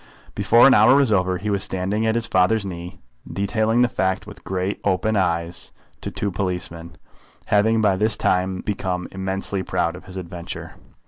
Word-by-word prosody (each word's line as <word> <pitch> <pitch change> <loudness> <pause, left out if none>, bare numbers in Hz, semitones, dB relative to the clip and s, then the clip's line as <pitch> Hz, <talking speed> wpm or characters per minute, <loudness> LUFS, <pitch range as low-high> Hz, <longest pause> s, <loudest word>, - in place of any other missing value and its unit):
Before 105 +4 +5
an 135 - +7
hour 110 +4 +6
was 140 -5 +3
over 95 -2 +1
he 105 +3 -3
was 100 -1 +3
standing 100 +4 -1
at 110 - +1
his 115 -1 0
father's 100 +2 +2
knee, 90 0 -7 0.3
detailing 110 +4 +1
the 125 - +5
fact 95 -4 -1
with 105 -1 -12
great 95 +1 -3
open 100 +3 +1
eyes 85 -3 -1 0.3
to - - -4
two 100 - -3
policemen, 90 -3 -4 0.5
having 110 +2 +2
by 100 -3 +2
this 110 +2 +2
time 95 0 0
become 90 -3 -3
immensely 95 0 -2
proud 90 -2 -1
of - - -12
his 95 0 -9
adventure. 85 -1 -7
95 Hz, 175 wpm, -22 LUFS, 90-105 Hz, 0.5 s, an